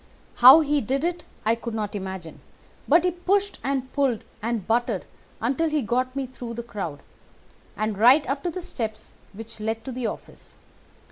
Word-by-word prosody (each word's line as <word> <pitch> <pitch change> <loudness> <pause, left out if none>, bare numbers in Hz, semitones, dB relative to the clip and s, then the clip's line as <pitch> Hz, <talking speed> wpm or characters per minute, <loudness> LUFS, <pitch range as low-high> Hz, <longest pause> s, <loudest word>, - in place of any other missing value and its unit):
How 260 +6 +10
he 295 -1 +1
did 270 +6 -1
it 345 0 -2 0.2
I 220 - +4
could 230 0 -5
not 210 -2 -3
imagine, 190 -5 -6 0.5
but 330 +4 +5
he 360 - +2
pushed 395 +3 0
and 265 -1 -2
pulled 270 -6 +1 0.2
and 225 -3 -2
butted 230 -3 0 0.3
until 275 +8 0
he 300 -3 0
got 255 +3 -1
me 275 -1 -1
through 245 -2 -8
the 235 - -5
crowd, 175 -11 -6 0.8
and 215 0 -1
right 255 +6 +6
up 275 +2 -1
to 355 - -2
the 360 +1 -5
steps 220 -6 -5 0.2
which 225 +2 -9
led 220 +1 -3
to 265 - -4
the 250 -2 -2
office. - - -9
245 Hz, 180 wpm, -25 LUFS, 220-280 Hz, 0.8 s, How